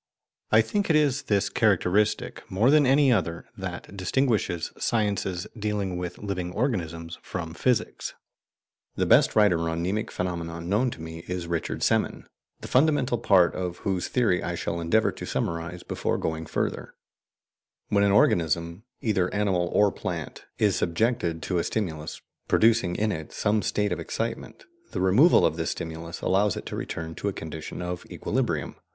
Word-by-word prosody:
I 110 - +7
think 200 - -1
it 160 - +4
is 145 -2 +3
this 100 -2 +1
characteristic, 105 -1 +1
more 110 +8 +3
than 150 -2 +5
any 135 0 +5
other, 85 -6 -1
that - - -7
distinguishes 100 -3 0
sciences 100 -5 0
dealing 105 -4 -2
with 90 0 -4
living 90 -3 -4
organisms 85 - -2
from 85 -2 -5
physics. 120 +4 -1 0.8
The - - +1
best - - +5
writer 90 -6 +4
on 85 +1 -2
mnemic 100 +4 -1
phenomena 85 -2 -3
known 100 +9 +1
to 85 - -8
me 80 0 -8
is 90 -1 -3
Richard 85 -1 -3
Semon, - - +1 0.4
the - - -7
fundamental 135 -3 +2
part 95 -6 +4
of 90 -1 -3
whose 95 -2 0
theory 115 -8 +2
I 85 - -3
shall 85 0 -3
endeavour 110 +7 +2
to - - -8
summarize 85 +1 -3
before - - -2
going 80 0 -3
further: - - -3 0.9
When 100 -1 +3
an 100 - +4
organism, 85 -1 +2 0.2
either 95 -5 +1
animal 95 -4 +1
or 105 -1 +4
plant, - - -5
is 105 -3 +3
subjected 85 -2 0
to 90 -2 0
a - - 0
stimulus, 80 -8 -3 0.2
producing 110 -6 +3
in 110 0 +1
it 80 -4 -5
some 105 0 +1
state 105 -1 0
of 90 - -1
excitement, 115 - -4 0.3
the - - -2
removal 105 - +5
of 80 - +1
the 80 - -2
stimulus 80 +1 -5
allows 100 +1 +2
it - - -6
to - - -5
return 80 0 -5
to 100 - -4
a 100 - 0
condition 80 +1 -6
of 90 0 -4
equilibrium. - - -2
95 Hz, 160 wpm, -26 LUFS, 85-110 Hz, 0.9 s, I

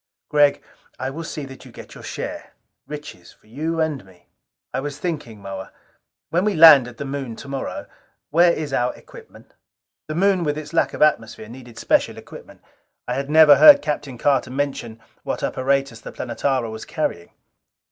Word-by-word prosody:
"Gregg, 145 -1 +3 0.3
I 130 +1 -4
will 165 +4 -6
see 150 -3 -6
that 135 -1 -12
you - - -14
get - - -12
your - - -12
share. - - -6 0.3
Riches 145 -12 -10
for - - -31
you 155 +9 -4
and 155 -6 -1
me." 90 -2 -22 0.4
"I 130 - -1
was 145 +1 -5
thinking, 145 - -5
Moa 95 -1 -8 0.6
when 175 +3 +1
we 210 -1 0
land 155 -6 +9
at 120 -1 -12
the 145 - -5
Moon 135 -4 -5
tomorrow 135 +2 -6 0.5
where 170 +3 +5
is 155 -4 -4
our 125 -1 0
equipment?" - - -16 0.5
The 155 - -4
Moon, 190 0 +2
with 150 -1 -1
its 155 +1 -8
lack 165 - +1
of - - +2
atmosphere, 115 -7 0
needed 120 -1 -12
special - - +1
equipment. - - -13 0.4
I 125 - -1
had 135 +2 -3
never 155 -2 +7
heard 290 -2 +9
Captain 145 -4 -4
Carter 135 0 +1
mention 130 -4 -4 0.2
what - - -4
apparatus 135 -2 -1
the - - -9
Planetara 125 -1 -2
was 110 0 -7
carrying. 85 - -3
140 Hz, 175 wpm, -21 LUFS, 120-155 Hz, 0.6 s, land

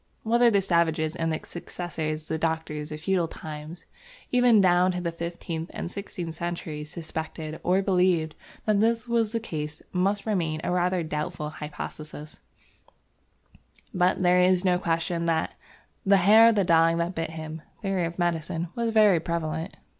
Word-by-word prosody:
Whether 235 +2 +4
the 200 -3 +3
savages 165 -3 +1
and 165 -2 -1
their 155 - -2
successors 160 -3 -5
the 160 - -2
doctors 160 -2 -2
of 155 0 -6
feudal 180 -1 +1
times 155 +1 -9 0.5
even 245 -3 +5
down 180 -1 +4
to 180 - -3
the 170 -1 -2
fifteenth 170 0 -5
and 170 - -4
sixteenth 180 -4 -6
centuries, 160 -3 -5
suspected 160 -1 -5
or 185 +2 +2
believed 180 -4 +2 0.3
that 215 -2 +3
this 230 +2 +1
was 230 -2 +1
the 230 - -1
case 150 -8 -5
must 195 +3 +1
remain 170 -8 0
a - - -1
rather 180 0 +1
doubtful 155 0 -4
hypothesis, 150 0 -8 1.5
but 180 0 +2
there 180 0 +5
is 180 +1 +3
no 180 -1 +3
question 170 0 -1
"that 165 -1 0 0.5
the 200 0 +5
hair 215 +5 +7
of 230 - +2
the 200 - +3
dog 165 -1 +4
that 170 +2 -1
bit 165 -2 -3
him" 160 0 -7 0.2
theory 195 -3 0
of 170 +1 -5
medicine 170 -1 -1
was 235 -1 0
very 210 -5 +5
prevalent. 165 +1 -3
170 Hz, 160 wpm, -26 LUFS, 160-190 Hz, 1.5 s, hair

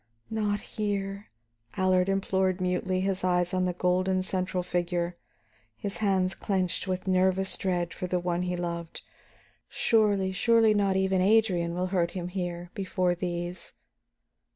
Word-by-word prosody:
"Not 210 -2 0
here," 200 -1 -3 0.5
Allard 185 0 +3
implored 190 -1 +1
mutely, 185 0 0
his 190 -1 -1
eyes 180 0 +1
on 185 0 +1
the 180 - 0
golden 185 +1 +1
central 185 -1 -2
figure, 175 0 -1 0.6
his 200 -1 -4
hands 190 -3 +1
clenched 185 -1 -1
with 185 0 -2
nervous 190 +1 +3
dread 175 -3 -1
for 180 - -4
the 180 0 0
one 175 0 -1
he 180 0 -1
loved. 170 -1 -5 0.7
"Surely, 205 -4 +2
surely 225 +2 +4
not 200 -2 +2
even 190 -1 +2
Adrian 185 -5 +3
will 180 +1 0
hurt 170 -2 +1
him 175 0 -4
here, 175 -1 -4
before 185 -2 0
these!" 175 0 -4
185 Hz, 140 wpm, -28 LUFS, 180-195 Hz, 0.7 s, surely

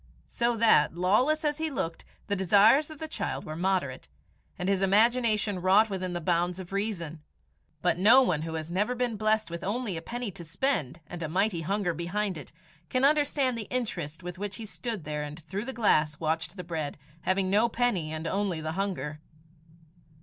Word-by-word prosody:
So 235 0 0
that, 215 -9 +4
lawless 245 - +2
as 295 0 0
he 320 0 -1
looked, 165 - -4 0.2
the 200 - 0
desires 205 - +5
of 310 - -9
the 315 - -5
child 315 - -3
were 155 - -5
moderate, 180 -7 -1 0.5
and 180 - -3
his 195 -1 +2
imagination 215 -1 +3
wrought 200 +4 +4
within 185 -2 -3
the 175 - -2
bounds 175 +1 0
of 185 0 -8
reason. 175 -7 -3 0.6
But 175 -1 +2
no 235 +8 +7
one 170 -11 +1
who 160 0 -4
has 160 +1 -5
never 210 +7 0
been 245 -2 -1
blessed 215 -2 +1
with 170 +1 -5
only 205 -2 -2
a - - -5
penny 240 +3 -4
to 180 -2 -9
spend 165 - -1
and 175 -1 -8
a 160 - -3
mighty 185 0 +1
hunger 190 +1 0
behind 185 +4 -2
it, 150 - -9 0.4
can 255 +1 +2
understand 285 -3 +2
the 215 - -6
interest 185 - -3
with 180 +1 -7
which 205 -1 -4
he 225 - -7
stood 220 -3 -5
there 150 0 -3
and 150 +2 -6
through 190 +7 -5
the 265 - -4
glass 155 - +2
watched 165 +3 -2
the 180 - -5
bread, 160 -4 -4 0.2
having 185 0 +1
no 215 +4 +4
penny 220 -10 0
and 155 +1 -5
only 190 -1 -1
the 160 0 -3
hunger. 160 -5 -3
190 Hz, 195 wpm, -28 LUFS, 165-225 Hz, 0.6 s, no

